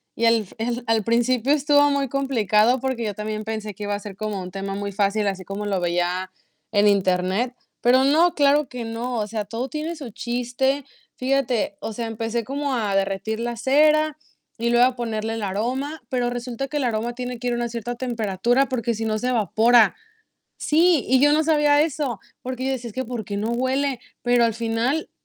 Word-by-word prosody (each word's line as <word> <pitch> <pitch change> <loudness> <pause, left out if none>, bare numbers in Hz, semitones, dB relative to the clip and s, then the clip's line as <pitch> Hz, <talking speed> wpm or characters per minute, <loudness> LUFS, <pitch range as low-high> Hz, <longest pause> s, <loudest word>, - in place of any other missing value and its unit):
y 230 - 0
al 230 -2 +4
el 240 +1 -2
al 225 -2 +2
principio, 240 +3 +2
estuvo 290 0 +4
muy 280 -2 0
complicado, 245 -3 +2
porque 260 -2 -2
yo 205 - -2
también, 215 +1 -4
pensé 215 -2 -4
que 205 - -8
iba 205 0 -1
a - - -4
ser 200 -1 -9
como 215 -2 -3
un 180 - -7
tema 195 0 -4
muy 200 0 -4
fácil, 205 +1 +1
así 190 -1 -2
como 200 +1 -5
lo 200 -2 0
veía 175 +1 -1 0.4
en 205 -1 +4
Internet. 190 +4 +1 0.3
Pero 255 +2 +5
no, 320 +5 +4
claro 290 0 +3
que 245 -2 -6
no. 235 +2 -3
O 210 - 0
sea, 215 -1 -3
todo 235 +5 -4
tiene 310 +4 -4
su 275 -7 -8
chiste. 250 +5 -1 0.3
Fíjate. 255 -6 0
O 225 - -5
sea, 230 +2 -4
empecé 225 +1 -2
como 280 +2 -2
a 210 -4 -1
derretir 195 +3 -1
la 235 0 -2
cera, 305 +4 +3 0.4
y 235 0 0
luego 240 +1 +5
a 255 -1 +1
ponerle 225 -2 -3
el 225 - -4
aroma, 255 +9 -2
pero 245 -2 0
resulta, 245 +2 -4
que 295 +2 -3
el 285 - 0
aroma 235 0 -1
tiene 250 -1 -5
que 245 - -3
ir 245 - +1
a - - 0
una 240 0 -2
cierta 235 +1 -4
temperatura, 240 +1 0
porque 235 -2 -1
si 225 0 -3
no, 215 -1 0
se 245 +4 -1
evapora. 230 -1 +4 0.6
Sí, 325 -1 +3
y 260 0 +4
yo 290 +1 +5
no 310 - +3
sabía 295 -2 +4
eso, 285 -7 -2 0.2
porque 255 0 -4
yo 270 - 0
decía: 245 -2 -4
"Es 210 - -12
que, 260 - -2
¿por 235 -2 -5
qué 200 - -4
no 215 +3 -1
huele?". 260 +2 0 0.2
Pero 245 -1 +3
al 230 - +1
final, 235 +7 -1
235 Hz, 210 wpm, -23 LUFS, 215-265 Hz, 0.6 s, Pero